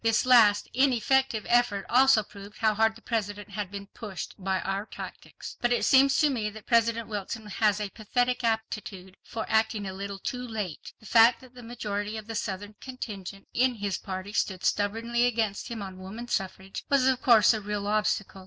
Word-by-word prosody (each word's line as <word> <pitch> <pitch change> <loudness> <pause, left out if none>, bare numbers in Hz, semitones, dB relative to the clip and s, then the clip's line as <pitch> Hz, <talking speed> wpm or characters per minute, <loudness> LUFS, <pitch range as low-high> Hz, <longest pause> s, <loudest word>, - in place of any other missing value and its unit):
This 225 +1 +2
last 220 -5 +6
ineffective 260 -2 +2
effort 240 -5 +2
also 260 -3 +5
proved 200 0 -12
how 220 -1 +2
hard 220 +1 +2
the 225 - -16
President 205 -3 -3
had 200 -2 -4
been 200 0 -7
pushed 200 -1 -7
by 190 0 0
our 195 +2 -3
tactics. - - -9
But 240 - +1
it 240 - +2
seems 270 +1 +5
to 300 - +4
me 220 -5 -1
that 215 0 -12
President 230 -1 +2
Wilson 215 +1 -5
has 210 0 +1
a 205 -2 -4
pathetic 245 +3 -1
aptitude 215 -4 -3
for 225 - -5
acting 220 -1 +1
a 190 - -5
little 200 +1 -5
too 250 +6 -4
late. 215 -10 -5
The - - -18
fact 230 +2 +6
that 255 -1 -16
the 250 - -11
majority 210 -2 -4
of 215 - -7
the 225 - -6
Southern 205 -1 -4
contingent 200 -7 -7
in 250 0 +2
his 200 -3 -3
party 190 0 -6
stood 190 -4 -1
stubbornly 230 +4 +1
against 220 -4 -1
him 225 -3 -5
on 190 -1 -8
woman 215 +6 -8
suffrage, 190 -3 -4
was 275 -2 +3
of 260 -1 +2
course 230 -2 +6
a 220 - -3
real 205 0 -3
obstacle. 210 -2 0
215 Hz, 190 wpm, -27 LUFS, 200-235 Hz, -, last